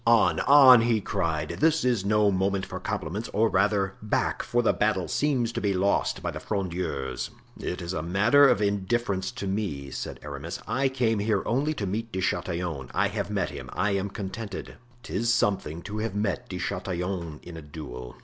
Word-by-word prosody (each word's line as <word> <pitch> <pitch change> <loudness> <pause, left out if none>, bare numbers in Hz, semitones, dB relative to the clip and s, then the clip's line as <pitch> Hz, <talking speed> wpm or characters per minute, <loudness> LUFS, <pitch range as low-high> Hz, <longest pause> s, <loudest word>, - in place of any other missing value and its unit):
"On, 115 -2 +5
on!" 135 -4 +8
he 115 -1 +2
cried, 80 -7 -1
"this 160 -1 +3
is 120 -6 +2
no 105 0 +3
moment 95 0 0
for 95 -1 -6
compliments; 95 +2 -3
or 110 +2 +3
rather, 100 0 +2
back, 105 - 0
for 120 0 0
the - - +3
battle 105 -4 +1
seems 130 -6 +1
to - - -3
be 100 -2 +1
lost 100 +2 +1
by - - -1
the - - -6
Frondeurs." 85 -9 -3 0.3
"It 90 - -4
is 85 +2 -4
a 75 - -2
matter 105 - +5
of 105 - +2
indifference 100 0 0
to 120 -4 -5
me," 95 -9 -3
said - - -5
Aramis; 75 +3 -6
"I 135 +1 +1
came 120 -5 +1
here 105 -1 +1
only 145 +6 0
to 105 - -3
meet 110 +4 -3
De 95 - -3
Chatillon; 85 -6 -2
I - - +2
have - - -3
met - - -1
him, - - -8
I 100 - +1
am 100 0 -1
contented; 100 +1 -6 0.3
'tis 115 +5 0
something 95 -8 0
to 105 +2 -5
have 110 -2 -3
met 105 -4 -1
De - - -4
Chatillon 90 -3 -3
in 85 - -9
a 80 - -7
duel!" 65 -5 -8
100 Hz, 190 wpm, -27 LUFS, 90-115 Hz, 0.3 s, on